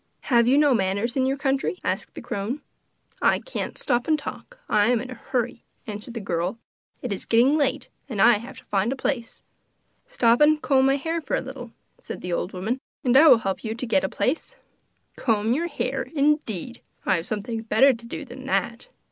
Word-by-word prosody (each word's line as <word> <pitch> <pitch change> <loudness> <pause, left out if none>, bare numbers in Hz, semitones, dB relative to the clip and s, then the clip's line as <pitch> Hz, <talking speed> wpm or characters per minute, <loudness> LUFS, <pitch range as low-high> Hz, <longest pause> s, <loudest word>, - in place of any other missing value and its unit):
'Have 235 -2 +3
you 265 +3 +5
no 295 -2 +5
manners 200 +2 0
in 260 -1 +2
your 270 +1 0
country?' 270 +5 0
asked - - -3
the - - -7
crone. 210 +8 -3 0.6
'I - - +4
can't - - -5
stop 245 -2 0
and 310 -1 +3
talk; 405 +11 -8
I 210 0 +3
am 245 -1 +3
in 255 +3 -7
a - - -4
hurry,' 240 -1 -3 0.2
answered 215 +3 -7
the - - -2
girl. 180 +1 -2 0.5
'It 245 -5 -2
is 195 - -8
getting 245 +6 +4
late, 280 -4 0 0.2
and 220 -6 -4
I 230 0 +6
have 245 +3 -10
to - - -13
find 205 +3 0
a - - -1
place.' 250 -3 -3 0.6
'Stop 240 - +3
and 305 +1 +5
comb 270 -3 +3
my 270 - +4
hair 325 +4 -2
for - - -2
a - - +1
little,' 260 -3 -8 0.3
said - - -7
the 180 -1 -3
old 180 - -2
woman, 215 +8 -2 0.2
'and 250 -1 +2
I 305 +4 +8
will 250 - +9
help 195 -4 -3
you 220 0 -3
to 245 - -4
get 225 -5 +2
a 190 - 0
place.' 275 - -2 0.6
'Comb 220 -1 +1
your 335 +6 0
hair, 270 -4 -2
indeed! 275 - 0 0.2
I 190 - +3
have 165 - -5
something 220 +2 -3
better 230 +5 +4
to 235 0 -10
do - - -6
than - - -10
that! - - -1
245 Hz, 210 wpm, -24 LUFS, 220-275 Hz, 0.6 s, will